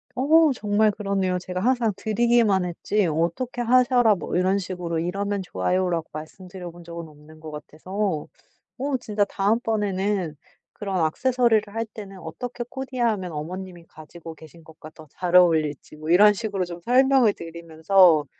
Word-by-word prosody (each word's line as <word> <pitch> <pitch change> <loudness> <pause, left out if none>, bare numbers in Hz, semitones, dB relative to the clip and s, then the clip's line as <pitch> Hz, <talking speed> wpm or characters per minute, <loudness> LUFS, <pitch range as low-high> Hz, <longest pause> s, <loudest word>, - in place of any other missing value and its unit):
어. 310 +4 +4
정말 210 -1 +2
그러네요. 195 -3 -1
제가 180 0 -5
항상 240 +1 +1
드리기만 220 -3 +2
했지 190 +4 -1
어떻게 170 +10 -1
하셔라 245 -2 +4
뭐 170 - -5
이런 185 +2 +2
식으로 175 -3 -3
"이러면 200 +4 -2
좋아요."라고 175 - -1
말씀드려 175 +3 -9
본 175 +1 -14
적은 170 0 -8
없는 155 +1 -17
것 155 0 -9
같아서. 160 +3 -4 0.5
어 275 0 -1
진짜 210 -3 0
다음 205 +3 0
번에는 200 -6 -1 0.4
그런 190 -5 -1
액세서리를 230 +1 +1
할 225 +1 -2
때는 200 -3 -10
어떻게 240 +9 -6
코디하면 240 -9 -2
어머님이 175 +3 -7
가지고 160 +1 -12
계신 160 +1 -15
것과 155 0 -13
더 155 - -14
잘 180 +4 -3
어울릴지 160 -5 +3
뭐 155 +1 -7
이런 210 +4 +7
식으로 200 -3 -3
좀 175 0 -8
설명을 255 0 +4
드리면서 165 0 +2
190 Hz, 345 characters per minute, -24 LUFS, 170-220 Hz, 0.5 s, 이런